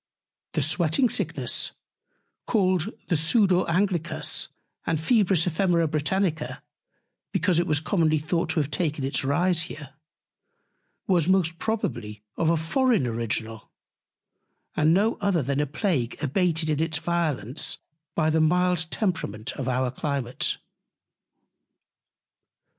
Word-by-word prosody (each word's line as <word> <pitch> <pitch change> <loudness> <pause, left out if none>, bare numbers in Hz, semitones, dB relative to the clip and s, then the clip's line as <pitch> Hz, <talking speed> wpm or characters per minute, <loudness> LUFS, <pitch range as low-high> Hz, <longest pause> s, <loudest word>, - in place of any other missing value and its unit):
The 155 - +1
Sweating 170 - +2
Sickness, - - 0 0.7
called 185 -3 +1 0.2
the 175 - +3
Sudor 185 +3 +3
Anglicus 175 -2 +1 0.4
and 160 - -1
Febris 190 -3 +3
Ephemera 170 -1 +2
Britannica, 155 +2 -1 0.7
because 180 0 +2
it 175 - 0
was 150 -3 +2
commonly 160 -1 +1
thought 160 +3 -1
to 160 - 0
have 145 -1 -1
taken 150 -2 -1
its 135 +1 0
Rise 170 +5 +2
here, 145 -2 -9 1.1
was 175 -3 +2
most 170 -3 +2
probably 115 - -3
of 160 - +1
a 165 - +3
foreign 215 - +2
Original, 115 -1 -3 1.1
and 155 +1 +3
no 205 +6 +2
other 185 -6 +1
than 140 +2 -1
a 150 - +1
Plague 150 - -1
abated 160 +2 +1
in 150 - 0
its 160 0 0
Violence 155 -8 0 0.4
by 155 -1 +2
the 160 0 +2
mild 180 0 +2
Temperament 165 - -2
of 135 -2 -5
our 130 0 0
Climate. 135 -3 -1
160 Hz, 120 wpm, -25 LUFS, 145-180 Hz, 1.1 s, the